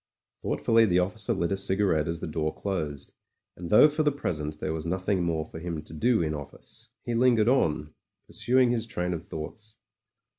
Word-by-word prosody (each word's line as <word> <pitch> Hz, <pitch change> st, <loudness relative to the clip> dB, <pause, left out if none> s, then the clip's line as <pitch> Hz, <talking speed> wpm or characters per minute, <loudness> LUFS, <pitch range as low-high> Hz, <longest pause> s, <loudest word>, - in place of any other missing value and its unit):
Thoughtfully 115 Hz, 0 st, +3 dB
the 90 Hz, -2 st, +2 dB
officer 95 Hz, +3 st, -1 dB
lit 85 Hz, +1 st, 0 dB
a -, -, +2 dB
cigarette 95 Hz, -5 st, +1 dB
as 85 Hz, 0 st, -3 dB
the -, -, -3 dB
door 80 Hz, 0 st, -1 dB
closed, 80 Hz, -8 st, -4 dB, 0.4 s
and 85 Hz, -1 st, -7 dB
though 105 Hz, +8 st, +8 dB
for 150 Hz, +1 st, -1 dB
the 150 Hz, -1 st, +3 dB
present 75 Hz, -, -4 dB
there 80 Hz, -, -2 dB
was 80 Hz, -1 st, -4 dB
nothing 95 Hz, +3 st, 0 dB
more 80 Hz, -2 st, -1 dB
for 80 Hz, -, -9 dB
him 80 Hz, -2 st, -5 dB
to -, -, -13 dB
do 110 Hz, +4 st, +2 dB
in 80 Hz, -1 st, -1 dB
office, 95 Hz, -, -10 dB
he 120 Hz, -, -3 dB
lingered 115 Hz, -2 st, +3 dB
on, 75 Hz, -, +1 dB, 0.3 s
pursuing 120 Hz, +3 st, +2 dB
his 115 Hz, -2 st, -1 dB
train 90 Hz, -6 st, -2 dB
of 85 Hz, -1 st, -5 dB
thoughts. 105 Hz, +9 st, -8 dB
90 Hz, 190 wpm, -27 LUFS, 80-115 Hz, 0.4 s, though